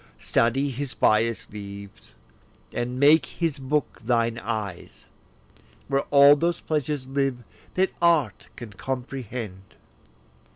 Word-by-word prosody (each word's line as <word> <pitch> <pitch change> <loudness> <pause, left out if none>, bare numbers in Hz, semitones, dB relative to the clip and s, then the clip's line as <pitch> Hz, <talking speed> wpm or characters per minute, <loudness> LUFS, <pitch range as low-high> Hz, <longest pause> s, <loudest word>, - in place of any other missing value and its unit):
Study 135 +5 +1
his 135 +1 -5
bias 110 +1 +2
leaves, 100 - -10 0.6
and 125 +1 -3
make 150 +3 +5
his 165 -4 -2
book 140 +2 -2
thine 115 0 +1
eyes, 105 -5 -5 0.8
Where 135 0 0
all 140 0 +8
those 170 +3 0
pleasures 150 -3 -2
live 135 -2 -1 0.3
that 190 +1 +1
art 155 - +2
can 115 -4 -9
comprehend. 120 -6 -6
130 Hz, 110 wpm, -25 LUFS, 110-145 Hz, 0.8 s, all